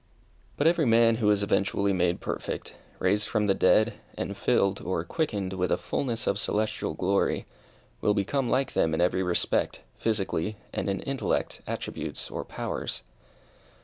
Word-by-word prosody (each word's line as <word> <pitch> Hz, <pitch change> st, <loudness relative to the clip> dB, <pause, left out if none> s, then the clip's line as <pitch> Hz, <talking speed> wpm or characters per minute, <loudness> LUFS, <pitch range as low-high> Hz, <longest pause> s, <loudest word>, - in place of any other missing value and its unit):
But 145 Hz, -, +1 dB
every 165 Hz, -3 st, +4 dB
man 115 Hz, 0 st, +5 dB
who 110 Hz, -3 st, +2 dB
is 105 Hz, -1 st, +3 dB
eventually 100 Hz, 0 st, +1 dB
made 90 Hz, -1 st, +1 dB
perfect -, -, -4 dB, 0.2 s
raised 105 Hz, +3 st, +1 dB
from 105 Hz, -2 st, +1 dB
the 100 Hz, -, +4 dB
dead, 105 Hz, +3 st, +3 dB, 0.2 s
and -, -, -3 dB
filled, 100 Hz, 0 st, +2 dB
or 85 Hz, -2 st, -1 dB
quickened, 100 Hz, -, -2 dB
with 90 Hz, -1 st, -1 dB
a -, -, +3 dB
fulness 120 Hz, -4 st, -2 dB
of 100 Hz, -, +1 dB
celestial 105 Hz, -7 st, -1 dB
glory, 95 Hz, +4 st, +1 dB, 0.6 s
will 105 Hz, -, +3 dB
become 120 Hz, +6 st, 0 dB
like 135 Hz, +1 st, +1 dB
them 80 Hz, -1 st, +2 dB
in -, -, -2 dB
every 90 Hz, +1 st, +2 dB
respect, 90 Hz, -2 st, +1 dB, 0.2 s
physically, 105 Hz, -2 st, -1 dB, 0.2 s
and -, -, -1 dB
in 100 Hz, -, -1 dB
intellect, 135 Hz, -1 st, -1 dB
attributes -, -, -4 dB
or -, -, -3 dB
powers. -, -, -4 dB
100 Hz, 155 wpm, -28 LUFS, 95-115 Hz, 0.6 s, man